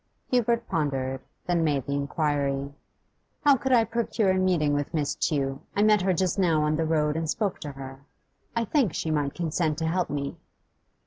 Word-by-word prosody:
Hubert 235 Hz, -1 st, +2 dB
pondered, 135 Hz, -5 st, -1 dB, 0.2 s
then 175 Hz, -2 st, +1 dB
made 145 Hz, -4 st, +1 dB
the 140 Hz, -, -2 dB
inquiry: 140 Hz, -1 st, -1 dB, 0.7 s
'How 285 Hz, -1 st, +7 dB
could 265 Hz, +1 st, -2 dB
I 240 Hz, -3 st, +6 dB
procure 225 Hz, -3 st, 0 dB
a 185 Hz, -, +1 dB
meeting 170 Hz, -6 st, +2 dB
with 145 Hz, +2 st, -2 dB
Miss 145 Hz, -2 st, 0 dB
Tew? 135 Hz, -3 st, -1 dB
I 205 Hz, -, +3 dB
met 210 Hz, -2 st, +5 dB
her 190 Hz, +1 st, +2 dB
just 185 Hz, +1 st, 0 dB
now 165 Hz, -5 st, +3 dB
on 150 Hz, 0 st, +1 dB
the 160 Hz, +1 st, 0 dB
road 150 Hz, -2 st, +1 dB
and 160 Hz, -1 st, -2 dB
spoke 200 Hz, +2 st, -1 dB
to 145 Hz, -2 st, -6 dB
her. 135 Hz, 0 st, -9 dB, 0.5 s
I 230 Hz, 0 st, +1 dB
think 245 Hz, -, +1 dB
she 160 Hz, -, -2 dB
might 145 Hz, -2 st, 0 dB
consent 160 Hz, -2 st, -1 dB
to 160 Hz, -, -2 dB
help 175 Hz, +2 st, 0 dB
me. 140 Hz, -1 st, -3 dB
160 Hz, 190 wpm, -26 LUFS, 145-190 Hz, 0.7 s, How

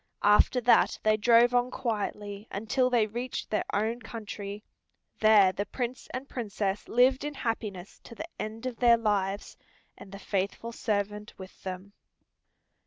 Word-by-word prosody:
After 210 Hz, +5 st, +5 dB
that 240 Hz, +1 st, +4 dB
they 215 Hz, 0 st, +4 dB
drove 235 Hz, +3 st, +5 dB
on 245 Hz, 0 st, +2 dB
quietly 210 Hz, -4 st, -4 dB
until 250 Hz, +5 st, 0 dB
they 240 Hz, -3 st, +3 dB
reached 240 Hz, +4 st, -5 dB
their 215 Hz, -, 0 dB
own 220 Hz, +4 st, 0 dB
country. 210 Hz, -2 st, -7 dB, 0.6 s
There 215 Hz, -3 st, +6 dB
the 200 Hz, +2 st, -4 dB
Prince 250 Hz, +2 st, -4 dB
and 260 Hz, +2 st, -5 dB
Princess 205 Hz, -5 st, -3 dB
lived 255 Hz, +3 st, +4 dB
in 295 Hz, 0 st, -4 dB
happiness 210 Hz, -7 st, -4 dB
to 230 Hz, -, -11 dB
the 320 Hz, -, -6 dB
end 220 Hz, +3 st, -5 dB
of 250 Hz, -3 st, -4 dB
their 235 Hz, -1 st, +5 dB
lives, 205 Hz, -3 st, -1 dB, 0.4 s
and 195 Hz, -, -13 dB
the 200 Hz, -, -8 dB
faithful 200 Hz, +3 st, -3 dB
servant 210 Hz, -2 st, -3 dB
with 190 Hz, 0 st, -12 dB
them. 190 Hz, +1 st, -7 dB
215 Hz, 150 wpm, -28 LUFS, 205-240 Hz, 0.6 s, There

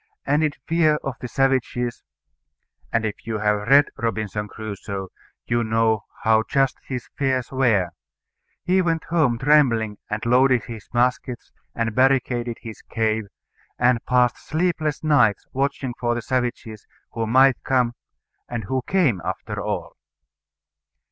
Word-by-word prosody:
And 150 Hz, +2 st, +2 dB
in 150 Hz, -2 st, +1 dB
fear 160 Hz, -2 st, +3 dB
of 135 Hz, -, -3 dB
the 125 Hz, -, -4 dB
savages 125 Hz, -2 st, 0 dB, 0.9 s
and 115 Hz, 0 st, +1 dB
if 105 Hz, +1 st, -5 dB
you 110 Hz, -1 st, -1 dB
have 105 Hz, 0 st, 0 dB
read 140 Hz, +3 st, +7 dB
Robinson 110 Hz, -2 st, -2 dB
Crusoe 100 Hz, -3 st, -6 dB, 0.4 s
you 120 Hz, 0 st, +1 dB
know 110 Hz, -1 st, +1 dB, 0.2 s
how 110 Hz, 0 st, +4 dB
just 135 Hz, -1 st, +1 dB
his 125 Hz, -2 st, -4 dB
fears 130 Hz, -3 st, 0 dB
were 115 Hz, -10 st, +2 dB, 0.7 s
he 185 Hz, +1 st, +3 dB
went 165 Hz, -3 st, 0 dB
home 150 Hz, -9 st, +3 dB
trembling 120 Hz, -7 st, +3 dB
and 105 Hz, +1 st, -3 dB
loaded 125 Hz, 0 st, +4 dB
his 115 Hz, -3 st, -9 dB
muskets, 125 Hz, 0 st, -1 dB, 0.2 s
and 115 Hz, -1 st, -1 dB
barricaded 125 Hz, -2 st, +1 dB
his 110 Hz, -2 st, -9 dB
cave, 110 Hz, -1 st, -1 dB, 0.5 s
and 120 Hz, -1 st, +2 dB
passed 125 Hz, -1 st, +3 dB
sleepless 160 Hz, -3 st, -1 dB
nights 125 Hz, -10 st, +3 dB
watching 135 Hz, -1 st, -1 dB
for 120 Hz, 0 st, 0 dB
the 120 Hz, -, -4 dB
savages 120 Hz, -4 st, -3 dB, 0.2 s
who 115 Hz, -1 st, -2 dB
might 130 Hz, +3 st, +4 dB
come, 125 Hz, -3 st, +1 dB, 0.6 s
and 120 Hz, -2 st, -3 dB
who 130 Hz, +6 st, -1 dB
came 150 Hz, -, +2 dB
after -, -, -4 dB
all. -, -, -4 dB
120 Hz, 135 wpm, -23 LUFS, 110-135 Hz, 0.9 s, read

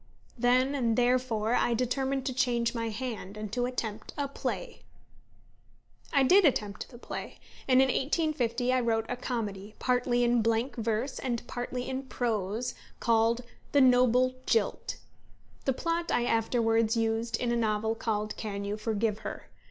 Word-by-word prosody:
Then 255 Hz, +3 st, +3 dB
and 235 Hz, -5 st, +1 dB
therefore 245 Hz, -3 st, +2 dB
I 240 Hz, -1 st, +2 dB
determined 265 Hz, +2 st, -1 dB
to 260 Hz, -, -1 dB
change 240 Hz, -2 st, +1 dB
my 230 Hz, -1 st, -2 dB
hand, 215 Hz, -3 st, -5 dB
and 215 Hz, -1 st, -6 dB
to 245 Hz, 0 st, +1 dB
attempt 220 Hz, -4 st, -5 dB
a 285 Hz, -1 st, 0 dB
play. 275 Hz, -, -4 dB, 1.3 s
I 280 Hz, -3 st, +4 dB
did 380 Hz, +9 st, +6 dB
attempt 210 Hz, -, 0 dB
the 240 Hz, -, -12 dB
play, -, -, -7 dB, 0.3 s
and 260 Hz, 0 st, +6 dB
in -, -, +2 dB
1850 260 Hz, -4 st, 0 dB
I 255 Hz, -, +3 dB
wrote 225 Hz, -2 st, +1 dB
a 250 Hz, -, -2 dB
comedy, 210 Hz, -5 st, -4 dB
partly 245 Hz, -1 st, +1 dB
in 240 Hz, -1 st, +3 dB
blank 230 Hz, +3 st, 0 dB
verse, 230 Hz, +3 st, -2 dB
and 240 Hz, -3 st, -2 dB
partly 245 Hz, +1 st, -4 dB
in 260 Hz, 0 st, -2 dB
prose, 230 Hz, -1 st, -1 dB, 0.3 s
called 230 Hz, +1 st, +2 dB, 0.3 s
The 285 Hz, -, +6 dB
Noble 255 Hz, 0 st, +5 dB
Jilt. 460 Hz, -, 0 dB, 0.7 s
The 270 Hz, -, +2 dB
plot 335 Hz, +5 st, -1 dB
I 240 Hz, -, +2 dB
afterwards 225 Hz, -1 st, +2 dB
used 225 Hz, 0 st, 0 dB
in 240 Hz, -1 st, 0 dB
a -, -, +2 dB
novel 220 Hz, -1 st, +1 dB
called 215 Hz, -2 st, -2 dB
_Can 200 Hz, -2 st, -4 dB
You 205 Hz, +1 st, -2 dB
Forgive 215 Hz, 0 st, -1 dB
Her? -, -, -7 dB
240 Hz, 155 wpm, -29 LUFS, 225-255 Hz, 1.3 s, did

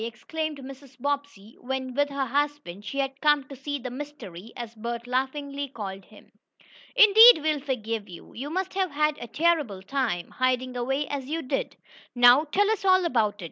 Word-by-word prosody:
exclaimed 310 Hz, +6 st, -5 dB
Mrs. 270 Hz, 0 st, -12 dB
Bobbsey 280 Hz, -6 st, -4 dB
when, 260 Hz, 0 st, -4 dB
with 285 Hz, +2 st, +1 dB
her 275 Hz, -1 st, -2 dB
husband, 285 Hz, -7 st, -2 dB
she 275 Hz, +7 st, -5 dB
had 270 Hz, 0 st, -2 dB
come 295 Hz, -2 st, +4 dB
to 280 Hz, -, -9 dB
see 285 Hz, +2 st, -4 dB
the 255 Hz, -2 st, -7 dB
"mystery," 250 Hz, -9 st, -9 dB
as 235 Hz, -2 st, -7 dB
Bert 235 Hz, +1 st, -5 dB
laughingly 280 Hz, +3 st, -2 dB
called 195 Hz, -7 st, -7 dB
him. 215 Hz, -, -18 dB, 0.6 s
"Indeed 445 Hz, -1 st, +9 dB
we'll 305 Hz, -1 st, +1 dB
forgive 230 Hz, -6 st, -4 dB
you. 175 Hz, -, -12 dB
You 270 Hz, +5 st, -6 dB
must 375 Hz, +3 st, -3 dB
have 380 Hz, -1 st, 0 dB
had 300 Hz, 0 st, 0 dB
a 240 Hz, -, -7 dB
terrible 290 Hz, -, 0 dB
time, 230 Hz, -7 st, -2 dB
hiding 255 Hz, 0 st, 0 dB
away 270 Hz, +4 st, -1 dB
as 280 Hz, -2 st, -4 dB
you 320 Hz, +4 st, -3 dB
did. -, -, -3 dB, 0.4 s
Now 245 Hz, +5 st, +7 dB
tell 410 Hz, +4 st, +3 dB
us 440 Hz, -, -2 dB
all 375 Hz, -1 st, +4 dB
about 225 Hz, -9 st, +1 dB
it. -, -, -33 dB
270 Hz, 180 wpm, -26 LUFS, 240-295 Hz, 0.6 s, Indeed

